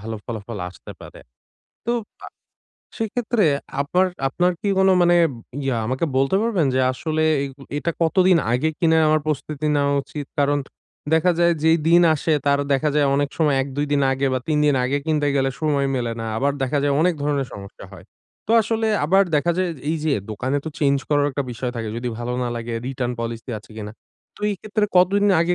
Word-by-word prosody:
ভালো 110 +1 -5
ফলাফল 110 -2 -6
আসতে 90 - -12
পারে। - - -12 0.7
তো 235 - 0 0.3
আ - - -9 0.7
সেইক্ষেত্রে 225 0 0 0.4
আবার 180 +7 +2 0.2
আপনার 180 +6 +1
কি 205 - -2
কোন 190 0 +4
মানে 175 0 +4 0.5
ইয়া 135 -3 0
আমাকে 130 +6 -1
বলতে 135 +8 +2
পারবেন 205 -9 +1
যে 130 - +2
আসলে 155 +3 -2 0.2
এইগু 140 0 -7 0.2
এটা 160 +3 -1
কতদিন 180 +2 +4
আগে 130 +6 +1
কিনে 160 -1 +3
আমার 155 0 +3
প্রস্তুতি 150 0 -3
নেওয়া 140 0 +2
উচিত? 145 +1 -7
কারণ 145 0 +2 0.5
দেখা 160 +3 +4
যায় 170 0 +4
যেই 160 +1 +5
দিন 170 +1 +6
আসে 155 +1 -1
তার 140 0 +3
দেখা 135 +3 +2
যায় 150 -1 +3
অনেক 145 0 +1
সময় 150 -4 +3
১-২ 140 +2 -3
দিন 140 -1 +2
আগে 135 +1 0
বা - - +1
৩ 150 -1 +2
দিন 145 -2 +3
আগে 135 +3 0
কিনতে 150 -2 +1
গেলে 135 0 +1
সময় 145 -3 +1
মেলে 120 -2 -2
না, - - -4
আবার 140 +4 +1
দেখা 135 +3 0
যায় 145 - +2
অনেক 175 +2 +3
ধরনের 145 -2 0
সমস্যা 100 -1 -10
হয়। - - -12 0.4
তো - - -4
আসলে 225 +1 -1 0.2
আবার 195 +6 +4
দেখা 170 +4 +2
যায়, 185 - +1 0.2
এই 165 - 0
যে 155 - +2 0.2
দোকানে 130 +6 -2
তো - - -3
চেঞ্জ 140 -2 +3
করার 145 -1 +2
একটা 140 +1 -2
বিষয় 120 +1 -4
থাকে, 115 -1 -3
যদি 120 +1 -3
ভালো 120 +1 -3
না 125 - -1
লাগে 115 0 -5
রিটার্ন 125 -2 -2
পলিসি 115 +2 -5
আছে 110 - -19
কিনা? 105 -1 -6 0.4
তো - - -17
এই - - -1
ক্ষেত্রে 215 0 -1
কতদিন 195 +3 +4 0.2
আগে 175 +1 +2
145 Hz, 195 wpm, -22 LUFS, 130-170 Hz, 0.7 s, দিন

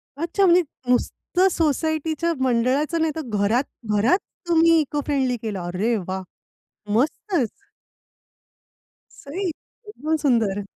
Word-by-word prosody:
अच्छा. 340 +6 +1
म्हणजे 355 0 +6 0.3
नुसतं 355 +8 +1
सोसायटीच्या 315 +1 0
मंडळाचं 260 +6 +1
नाही, 320 -1 +2
तर 320 - -3 0.2
घरात-घरात 220 - +1 0.3
तुम्ही 330 -1 +5
इको 295 0 -2
फ्रेंडली 265 -4 0
केलं. 215 -4 -4
अरे 180 +7 -1
वाह! 190 0 -3 0.7
मस्तच. 285 - 0 1.7
सही! 360 +8 -3 0.4
एकदम 320 -7 -2
सुंदर! 220 -6 +2
285 Hz, 100 wpm, -23 LUFS, 230-330 Hz, 1.7 s, म्हणजे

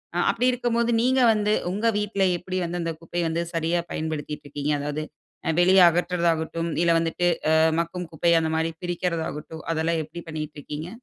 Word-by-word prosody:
அ - - 0
அப்டி 235 +2 -1
இருக்கும் 240 -1 -1
போது 235 0 +2
நீங்க 260 +1 +3
வந்து 210 0 +1 0.2
உங்க 210 +5 0
வீட்ல 205 -1 -1
எப்டி 185 +1 -5
வந்து 175 +1 -3
அந்த 165 0 -2
குப்பைய 175 +1 -3
வந்து 165 +1 -1
சரியா 165 +1 +1
பயன்படுத்திட்டுருக்கீங்க? 150 -2 -3
அதாவது 150 +1 -3 0.6
வெளிய 185 +2 +6
அகற்றுறதாகட்டும், 170 -1 0
இல்ல 170 -1 +3
வந்துட்டு, 165 +2 0 0.2
அ - - +4 0.3
மக்கும் 175 +1 -5
குப்பை 170 +2 +2
அந்த 160 -1 -1
மாரி 160 +1 0
பிரிக்கிறதாகட்டும், 170 -3 -3
அதெல்லாம் 165 +1 0
எப்டி 155 +3 -9
பண்ணிக்கிட்டுருக்கீங்க? 155 0 -6
170 Hz, 160 wpm, -25 LUFS, 160-180 Hz, 0.6 s, வெளிய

